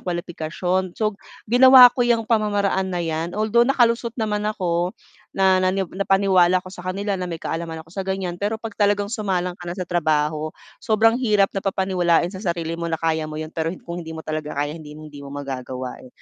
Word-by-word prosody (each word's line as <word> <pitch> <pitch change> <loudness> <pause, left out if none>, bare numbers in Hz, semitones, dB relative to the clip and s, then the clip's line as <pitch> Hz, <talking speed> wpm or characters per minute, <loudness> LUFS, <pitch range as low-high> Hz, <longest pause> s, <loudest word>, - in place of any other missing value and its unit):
kwalipikasyon. 175 +1 -2
So, 215 -1 +1 0.4
ginawa 250 0 +9
ko - - -1
yang 230 -2 +2
pamamaraan 205 -4 +1
na 175 - -1
'yan. 165 +2 -3
Although, 220 +3 +3
nakalusot 235 -2 +2
naman 210 -1 -1
ako 180 -3 -1 0.4
na 190 -1 +4
nani 185 +1 +1
napaniwala 185 -1 +2
ako 185 - -10
sa 180 - -9
kanila 195 +3 -3
na 180 - -3
may 165 - -4
kaalaman 165 0 -5
ako 165 - -20
sa 195 - -4
ganyan, 190 -2 -3
pero 210 +2 -1
kapag 225 -1 -7
talagang 205 +1 +2
sumalang 185 -5 -1
ka 175 - -7
na 175 - -5
sa 180 - -3
trabaho 155 -2 0 0.3
sobrang 225 +3 +3
hirap 210 -5 +2
napapaniwalain 190 -2 +1
sa 190 - -7
sarili 170 -4 -2
mo 170 - -2
na 160 - -1
kaya 160 -1 -1
mo 155 - -7
'yon, 155 +1 -6
pero 160 0 -2 0.2
kung 170 +1 -5
hindi 160 -1 -8
mo 160 - -8
talaga 155 -1 -4
kaya 145 +1 -1
hindi 150 -2 -10
hindi 150 -2 -11
mo 140 - -9
magagawa, 130 -2 -6
eh. 130 - -13
180 Hz, 195 wpm, -22 LUFS, 160-205 Hz, 0.4 s, ginawa